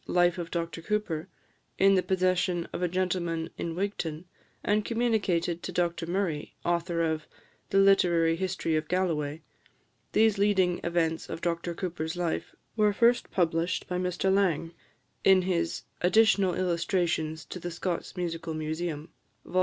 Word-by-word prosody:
Life 175 Hz, 0 st, +3 dB
of 170 Hz, -1 st, -4 dB
Dr 165 Hz, -1 st, -3 dB
Couper, 190 Hz, -4 st, -2 dB, 0.5 s
in 195 Hz, +1 st, +5 dB
the 190 Hz, -, +4 dB
possession 185 Hz, -2 st, +1 dB
of -, -, -4 dB
a 180 Hz, -, +2 dB
gentleman 175 Hz, -2 st, -1 dB
in 165 Hz, -1 st, -3 dB
Wigton, 175 Hz, -4 st, -3 dB, 0.4 s
and 210 Hz, +1 st, +2 dB
communicated 200 Hz, -8 st, 0 dB
to -, -, -5 dB
Dr 170 Hz, -1 st, -1 dB
Murray, 175 Hz, -4 st, -2 dB
author 170 Hz, 0 st, 0 dB
of 160 Hz, -1 st, -1 dB, 0.4 s
"The 195 Hz, -, +1 dB
Literary 175 Hz, -4 st, +4 dB
History 180 Hz, -2 st, -1 dB
of 155 Hz, 0 st, -1 dB
Galloway," 160 Hz, -4 st, -1 dB, 0.7 s
these 220 Hz, -2 st, +4 dB
leading 190 Hz, -3 st, +3 dB
events 165 Hz, -1 st, 0 dB
of 165 Hz, -, -4 dB
Dr 170 Hz, 0 st, -2 dB
Couper's 165 Hz, -2 st, -3 dB
life 175 Hz, -2 st, -2 dB, 0.2 s
were 210 Hz, -2 st, +3 dB
first 235 Hz, +3 st, +3 dB
published 165 Hz, -1 st, 0 dB
by 180 Hz, 0 st, -2 dB
Mr 180 Hz, +1 st, 0 dB
Laing, 175 Hz, -4 st, +1 dB, 0.5 s
in 190 Hz, -1 st, +6 dB
his 170 Hz, -2 st, -1 dB, 0.2 s
"Additional 195 Hz, -1 st, +4 dB
Illustrations 170 Hz, -3 st, 0 dB
to 180 Hz, -, -7 dB
the 175 Hz, -, -4 dB
Scots 175 Hz, +1 st, -4 dB
Musical 165 Hz, -2 st, -3 dB
Museum," 155 Hz, 0 st, -3 dB, 0.4 s
vol. 185 Hz, -, 0 dB
175 Hz, 145 wpm, -28 LUFS, 165-190 Hz, 0.7 s, in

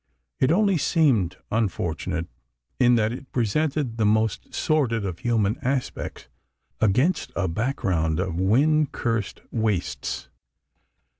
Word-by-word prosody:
It 130 Hz, +2 st, +3 dB
only 195 Hz, -1 st, +3 dB
seemed 130 Hz, -, +2 dB
unfortunate 90 Hz, -5 st, -1 dB, 0.5 s
in 125 Hz, -1 st, +5 dB
that 110 Hz, -1 st, +2 dB
it 130 Hz, +2 st, -8 dB
presented 130 Hz, +1 st, 0 dB
the -, -, +3 dB
most 110 Hz, -1 st, +1 dB
sordid 125 Hz, -9 st, +1 dB
of 90 Hz, -3 st, -4 dB
human 110 Hz, -4 st, +1 dB
aspects 130 Hz, 0 st, -3 dB, 0.5 s
against 130 Hz, -, +2 dB
a 95 Hz, -, 0 dB
background 85 Hz, -, 0 dB
of 90 Hz, -2 st, -1 dB
wind 140 Hz, -, +3 dB
cursed 115 Hz, -4 st, -2 dB
wastes. 95 Hz, -, -2 dB
115 Hz, 115 wpm, -24 LUFS, 95-135 Hz, 0.5 s, in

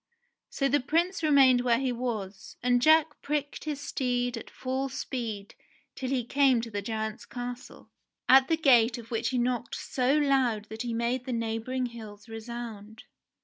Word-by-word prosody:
So 275 Hz, -, 0 dB
the 285 Hz, +2 st, +3 dB
Prince 335 Hz, +8 st, 0 dB
remained 270 Hz, -5 st, +5 dB
where 240 Hz, -2 st, +3 dB
he 260 Hz, 0 st, 0 dB
was, 220 Hz, -5 st, -5 dB
and 245 Hz, 0 st, +3 dB
Jack 315 Hz, +1 st, +4 dB
pricked 290 Hz, 0 st, -3 dB
his 300 Hz, -2 st, -3 dB
steed 245 Hz, -3 st, -1 dB
at 230 Hz, -, -8 dB
full 260 Hz, +1 st, -3 dB
speed 230 Hz, -6 st, -5 dB, 0.4 s
till 260 Hz, -, -5 dB
he 260 Hz, -2 st, 0 dB
came 270 Hz, -1 st, +3 dB
to 230 Hz, 0 st, -7 dB
the 205 Hz, -1 st, -3 dB
giant's 220 Hz, 0 st, -4 dB
castle, 245 Hz, 0 st, -8 dB, 0.4 s
at 265 Hz, 0 st, +7 dB
the 325 Hz, -, +2 dB
gate 245 Hz, -6 st, +4 dB
of 235 Hz, -1 st, -11 dB
which 230 Hz, 0 st, 0 dB
he 255 Hz, -, -1 dB
knocked 240 Hz, -1 st, -1 dB
so 260 Hz, +3 st, 0 dB
loud 265 Hz, -7 st, +2 dB
that 220 Hz, +1 st, -6 dB
he 240 Hz, -1 st, -3 dB
made 240 Hz, +2 st, -1 dB
the 260 Hz, -, -4 dB
neighbouring 230 Hz, +3 st, -2 dB
hills 220 Hz, -3 st, -9 dB
resound. 225 Hz, -1 st, -8 dB
245 Hz, 170 wpm, -28 LUFS, 230-270 Hz, 0.4 s, at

